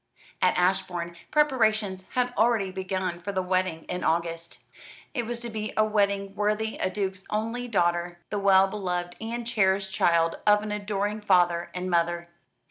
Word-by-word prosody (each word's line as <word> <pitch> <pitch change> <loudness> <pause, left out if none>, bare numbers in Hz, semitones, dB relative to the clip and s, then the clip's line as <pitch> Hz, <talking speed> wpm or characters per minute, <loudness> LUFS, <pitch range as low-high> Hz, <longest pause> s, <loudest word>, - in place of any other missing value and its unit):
At - - +3
Ashbourne 180 -2 0
preparations 220 -10 +2
had 250 -1 +1
already 220 -3 +2
begun 185 -2 -3
for 190 +3 -4
the 190 -1 -1
wedding 185 -3 0
in 180 - -4
August. 165 +1 -1 0.6
It 240 -4 -2
was 240 0 -3
to 240 - -5
be 215 0 -4
a 215 - +5
wedding 200 -2 0
worthy 210 +2 -1
of - - +1
a - - -2
duke's 190 -1 -3
only 225 +3 -2
daughter, 175 -4 0
the 205 - -1
well 195 -1 +5
beloved 180 -3 -3
and 235 +1 -4
cherished 190 -4 +1
child 165 -2 +2
of 210 0 +5
an 215 - -4
adoring 205 0 -2
father 175 -4 +3
and 180 0 -3
mother. 170 0 0
195 Hz, 165 wpm, -27 LUFS, 180-215 Hz, 0.6 s, a